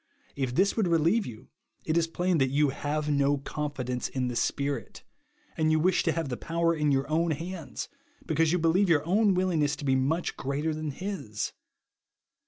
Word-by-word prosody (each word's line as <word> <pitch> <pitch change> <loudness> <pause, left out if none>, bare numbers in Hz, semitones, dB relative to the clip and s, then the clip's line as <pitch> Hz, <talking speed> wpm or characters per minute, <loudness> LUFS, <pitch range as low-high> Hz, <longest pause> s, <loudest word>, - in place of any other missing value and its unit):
If 130 -3 -2
this 195 +5 +3
would 215 -5 +1
relieve 170 +6 +2
you, 115 0 -10 0.4
it 155 - 0
is 170 -1 +3
plain 175 0 0
that 135 -1 +3
you 145 +2 +3
have 150 +2 -2
no 145 -1 +2
confidence 135 -3 -3
in 130 -2 -1
the 120 - -4
Spirit; 140 +3 -2 0.5
and 155 -1 +2
you 155 - +3
wish 185 +3 +3
to 165 - +1
have 165 -2 -2
the 125 - -3
power 170 0 0
in 150 -2 +1
your 135 0 +1
own 165 +3 +1
hands, 165 +2 -4 0.4
because 160 0 +2
you 180 - +3
believe 175 +4 +3
your 155 -3 +3
own 200 +2 +3
willingness 165 -6 +1
to 145 - -7
be 135 -1 +3
much 150 +7 0
greater 145 +4 -2
than 155 0 -3
his. 145 - -4
155 Hz, 190 wpm, -28 LUFS, 140-170 Hz, 0.5 s, this